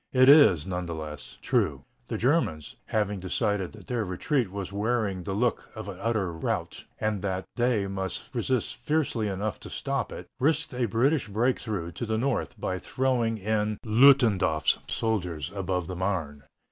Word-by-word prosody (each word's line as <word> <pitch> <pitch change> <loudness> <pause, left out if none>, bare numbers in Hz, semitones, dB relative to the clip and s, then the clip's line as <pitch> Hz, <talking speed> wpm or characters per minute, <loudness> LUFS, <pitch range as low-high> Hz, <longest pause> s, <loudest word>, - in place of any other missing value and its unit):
It 130 0 +6
is, 140 - +7
none 90 -2 -3
the 85 - -4
less, 75 -3 -8
true. - - +1 0.2
The - - -3
Germans, 115 - 0
having 105 -2 0
decided 95 0 -1
that 105 -4 -13
their 120 -3 -1
retreat 105 +6 0
was 100 -1 -5
wearing 105 -3 0
the 90 +3 -4
look 120 +3 0
of 110 -3 -6
utter 100 -1 -1
rout, 80 - -3
and 110 -2 -1
that 95 -2 -2
they 120 -4 +2
must 95 +5 -4
resist 125 0 -1
fiercely 145 -8 0
enough 100 0 -3
to - - -9
stop - - -2
it, - - -7
risked 150 +2 +1
a 125 -1 0
British 130 +7 +2
break 115 +5 +1
through 95 -7 -4
to 115 +8 -5
the 110 0 0
north 125 -1 -1
by 95 0 -2
throwing 120 -3 0
in 105 +1 0
Ludendorf's 110 - +5
prize - - -23
soldiers 90 -10 -1
above 95 -3 -1
the 90 - -5
Marne. 85 -7 -2
105 Hz, 170 wpm, -27 LUFS, 95-120 Hz, 0.2 s, is